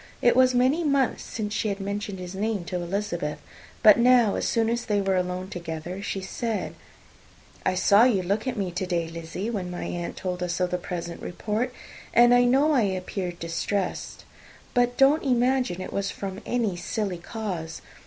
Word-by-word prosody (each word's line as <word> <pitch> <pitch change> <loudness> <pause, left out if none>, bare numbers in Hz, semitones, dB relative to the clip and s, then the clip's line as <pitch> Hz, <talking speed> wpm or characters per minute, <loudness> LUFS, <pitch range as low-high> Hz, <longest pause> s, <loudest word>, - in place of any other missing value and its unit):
It 240 - +4
was 255 0 +5
many 260 +7 +3
months 280 -4 +1
since 210 -2 -4
she 220 - 0
had 200 0 -3
mentioned 200 0 -4
his 180 0 -7
name 205 -1 -2
to 180 - -5
Elizabeth; 175 -4 -2 0.5
but 210 0 +9
now, 240 -3 +5
as - - -1
soon 230 -2 +2
as 235 +1 0
they 205 -1 +1
were 195 -1 +1
alone 180 0 -1
together, 170 +1 -6
she 200 -1 -3
said, 220 +3 -3 0.9
"I 185 - +2
saw 200 +5 +5
you 205 -7 +2
look 205 +7 -1
at 255 -2 -2
me 190 -3 -1
to 185 +2 -3
day, 170 -2 0
Lizzy, 165 +6 -5
when 190 -5 -3
my 180 - -5
aunt 175 -1 -4
told 180 -1 -3
us 180 0 -2
of 180 -1 0
the 180 - 0
present 170 -1 -5
report; 220 +7 -2 0.4
and 240 +1 +7
I 245 0 +5
know 275 +5 +4
I 270 -5 +4
appeared 185 -2 -2
distressed; 180 +3 -3 0.5
but 245 0 +2
don't 280 +4 +5
imagine 250 -6 +1
it - - -6
was 200 0 -1
from 195 0 -6
any 230 -6 0
silly 185 0 -3
cause. 175 -5 -5
200 Hz, 185 wpm, -26 LUFS, 180-235 Hz, 0.9 s, but